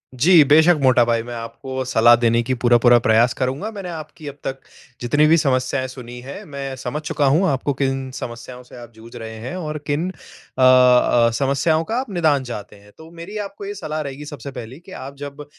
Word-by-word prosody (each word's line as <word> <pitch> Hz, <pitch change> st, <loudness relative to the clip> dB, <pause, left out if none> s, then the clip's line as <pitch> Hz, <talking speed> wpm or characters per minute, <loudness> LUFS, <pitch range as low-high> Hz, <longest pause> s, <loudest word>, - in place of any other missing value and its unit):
जी, 160 Hz, +5 st, +6 dB
बेशक 160 Hz, +5 st, +5 dB
मोटा 130 Hz, -2 st, +5 dB
भाई, 115 Hz, -1 st, 0 dB
मैं 120 Hz, +1 st, -8 dB
आपको 130 Hz, +3 st, -6 dB
सलाह 120 Hz, -1 st, +5 dB
देने 115 Hz, 0 st, +2 dB
की 130 Hz, -, +1 dB
पूरा-पूरा 120 Hz, 0 st, +5 dB
प्रयास 115 Hz, +2 st, +4 dB
करूँगा। 135 Hz, +12 st, -2 dB
मैंने 195 Hz, -3 st, -6 dB
आपकी 155 Hz, -2 st, -9 dB
अब 140 Hz, -, -7 dB
तक 135 Hz, 0 st, -4 dB, 0.4 s
जितनी 145 Hz, +5 st, +2 dB
भी 165 Hz, +2 st, +5 dB
समस्याएँ 130 Hz, -2 st, 0 dB
सुनी 125 Hz, -1 st, -10 dB
हैं, 140 Hz, -, -8 dB
मैं 140 Hz, -2 st, -6 dB
समझ 145 Hz, +5 st, -4 dB
चुका 150 Hz, -1 st, -1 dB
हूँ 165 Hz, +6 st, +3 dB
आपको 140 Hz, +1 st, -1 dB
किन 135 Hz, -1 st, -1 dB
समस्याओं 120 Hz, +1 st, -8 dB
से 125 Hz, -, -16 dB
आप 120 Hz, -1 st, -12 dB
जूझ 115 Hz, +2 st, -14 dB
रहे 110 Hz, -1 st, -7 dB
हैं 130 Hz, -, -5 dB
और 155 Hz, -4 st, -4 dB
किन 155 Hz, +5 st, -1 dB
अ, -, -, -8 dB, 0.5 s
अ, 125 Hz, -2 st, +5 dB
समस्याओं 140 Hz, +4 st, +1 dB
का 225 Hz, -, -1 dB
आप 260 Hz, -, -5 dB
निदान 160 Hz, -7 st, +1 dB
चाहते 105 Hz, -5 st, -8 dB
हैं। 100 Hz, 0 st, -19 dB
तो 160 Hz, 0 st, -13 dB
मेरी 195 Hz, +6 st, -7 dB
आपको 400 Hz, -, -11 dB
ये 405 Hz, -, -5 dB
सलाह 155 Hz, -, -4 dB
रहेगी, 140 Hz, 0 st, -7 dB
सबसे 140 Hz, -2 st, -8 dB
पहली, 125 Hz, +2 st, -9 dB
कि 180 Hz, +2 st, -16 dB
आप 140 Hz, -4 st, -8 dB
जब 145 Hz, +1 st, -9 dB
135 Hz, 210 wpm, -20 LUFS, 120-150 Hz, 0.5 s, जी